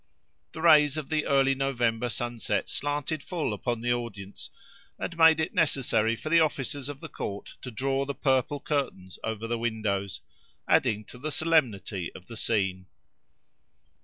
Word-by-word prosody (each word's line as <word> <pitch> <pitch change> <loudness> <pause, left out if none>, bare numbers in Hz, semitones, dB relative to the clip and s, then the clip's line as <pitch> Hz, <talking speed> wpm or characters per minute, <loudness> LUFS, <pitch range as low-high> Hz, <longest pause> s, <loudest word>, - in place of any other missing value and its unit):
The 160 - -6
rays 150 -3 +6
of 155 -3 -4
the 155 -1 0
early 135 -1 +4
November 125 -3 0
sunset 120 -1 -2
slanted 145 +1 -1
full 165 - -2
upon 120 +2 -2
the 120 +1 +2
audience, 105 -5 -6 0.5
and 170 - -4
made 160 -1 +6
it 160 - -1
necessary 125 - +2
for 155 - -6
the 165 +1 +6
officers 145 -3 0
of 145 -1 -7
the 165 - -6
Court 100 -8 -6
to 125 - -6
draw 135 +3 -1
the 140 0 -4
purple 135 +1 +1
curtains 135 - -3
over 110 0 -3
the 115 0 -2
windows, 105 -4 -2 0.5
adding 105 0 +3
to 125 - -12
the 155 +4 -3
solemnity 115 - +1
of 90 - -11
the 115 - -10
scene. 95 -4 0
130 Hz, 160 wpm, -28 LUFS, 110-145 Hz, 0.5 s, rays